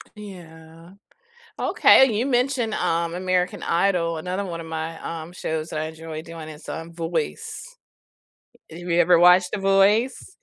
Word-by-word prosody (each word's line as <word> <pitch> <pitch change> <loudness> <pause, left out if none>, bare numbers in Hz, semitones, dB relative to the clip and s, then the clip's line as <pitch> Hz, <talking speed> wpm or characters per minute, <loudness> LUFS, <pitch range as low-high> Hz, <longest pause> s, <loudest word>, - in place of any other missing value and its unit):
Yeah. 165 -4 -13 0.7
Okay, 265 - +5
you 220 +3 -1
mentioned, 250 -3 0
um, 170 0 -1
American 180 0 -1
Idol, 170 -2 +1
another 185 +5 -3
one 170 -3 -6
of 165 - -9
my, 160 0 -5
um, 165 0 -6
shows 160 -2 -4
that 155 - -4
I 155 - -2
enjoy 160 0 -7
doing 165 -1 -10
is, 155 0 -12
um, 165 +1 -7
Voice. 175 - -5 0.9
Have 165 - -9
you 175 -1 -1
ever 175 0 +5
watched 180 +1 +5
The - - -2
Voice? 205 - +2
175 Hz, 150 wpm, -23 LUFS, 165-195 Hz, 0.9 s, Okay